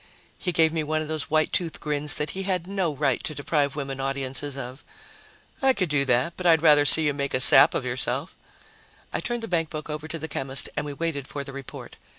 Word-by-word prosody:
He 180 - -3
gave 160 -2 +1
me 160 -1 -2
one 155 +1 -2
of - - -9
those 155 -1 -4
white 155 0 0
tooth 170 -3 -2
grins 150 0 +2
that 150 0 -3
he 195 - -6
had 185 -3 -3
no 190 -3 -2
right 140 -1 -1
to 155 - -4
deprive 145 0 -2
women 135 -2 -6
audiences 135 +1 -3
of. 130 +1 -9 0.8
"I 265 -1 +3
could 185 -8 -2
do 145 -2 0
that, 125 +5 0
but 180 - -3
I'd 160 -1 +3
rather 150 -2 +5
see 160 +2 +11
you 145 - 0
make 140 -1 -4
a - - -1
sap 130 - +7
of - - -3
yourself." 130 +5 -2 0.8
I - - -2
turned 240 -1 -4
the - - -5
bankbook 160 -4 -4
over 150 +1 -7
to 165 - -6
the 160 0 -7
chemist 135 -3 -4
and 150 0 -4
we 145 - -6
waited 140 -3 -5
for 140 - -7
the 140 - -11
report. 140 -2 -11
150 Hz, 230 wpm, -24 LUFS, 140-165 Hz, 0.8 s, see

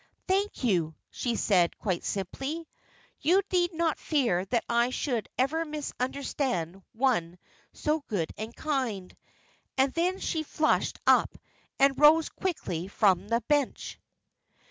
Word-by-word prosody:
"Thank 390 -4 0
you," 170 -9 +1 0.2
she 240 -2 -2
said, 180 -6 +2
quite 185 -5 -2
simply. 270 - -4 0.5
"You 365 +7 +3
need 350 -1 +3
not 330 -1 0
fear 240 - +1
that 235 +3 0
I 235 +1 +2
should 250 -4 -2
ever 295 +6 +1
misunderstand 265 - -3
one 220 -9 +1 0.3
so 305 +1 0
good 175 -8 -2
and 220 +2 -7
kind;" 250 -11 -2 0.6
and 265 0 +3
then 360 +3 +1
she 320 - -1
flushed 310 0 0
up, - - +4 0.4
and 275 0 +3
rose 305 +2 +6
quickly 185 - -3
from 195 -2 +2
the 230 +2 +1
bench. 285 +2 -1
260 Hz, 125 wpm, -28 LUFS, 200-310 Hz, 0.6 s, rose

